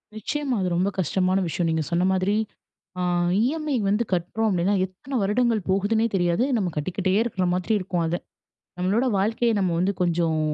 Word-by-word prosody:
நிச்சயமா, 270 +4 -2
அது 185 - 0
ரொம்ப 185 +3 +1
கஷ்டமான 185 +2 +1
விஷயம் 165 +1 -1
நீங்க 160 -1 0
சொன்ன 175 +1 +2
மாதிரி. 190 +2 +1 0.6
அ - - -1 0.4
இஎம்ஐ 305 +2 -1
வந்து 210 +4 +2
கட்டுறோம் 215 +6 0
அப்டின்னா 185 +3 +1
எத்தனை 220 +9 -8
வருடங்கள் 225 +2 +1
போகுதுன்னே 205 +4 +2
தெரியாது, 175 +4 +2
நம்ம 185 -5 -1
கட்டிக்கிட்டே 185 +5 -1
இருக்குற 190 -6 -1
மாதிரி 185 +4 0
இருக்கும் 180 -2 -2
அத 165 +2 -1 0.6
நம்மளோட 200 +8 +1
வாழ்க்கைய 230 +4 +1
நம்ம 185 -3 +1
வந்து 190 +3 +2
கொஞ்சம் 165 -2 +1
190 Hz, 160 wpm, -24 LUFS, 175-225 Hz, 0.6 s, சொன்ன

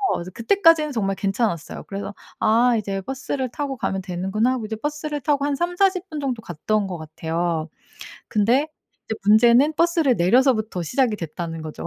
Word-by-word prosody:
그래서 180 +2 -6
그때까지는 325 - +3
정말 195 -4 -1
괜찮았어요. 195 -4 -2
그래서 200 0 -5 0.3
'아 235 +3 +4
이제 195 -2 -3
버스를 260 +3 -4
타고 285 -2 -3
가면 190 -4 -2
되는구나.' 190 +6 -1
하고 235 -4 -3
이제 220 - -4
버스를 295 +3 -3
타고 285 +1 +1
한 290 -1 0
30-40 365 +3 0
분 310 - -5
정도 255 -5 -2
갔던 200 +3 -1
것 180 - -5
같아요. 160 +1 -3 0.6
근데 235 +7 +2 0.4
이제 220 - -2
문제는 240 +7 +6
버스를 330 -5 +2
내려서부터 220 +1 +2
시작이 245 - +1
됐다는 165 -1 -5
거죠. 155 -1 -7
225 Hz, 375 characters per minute, -22 LUFS, 190-280 Hz, 0.6 s, 문제는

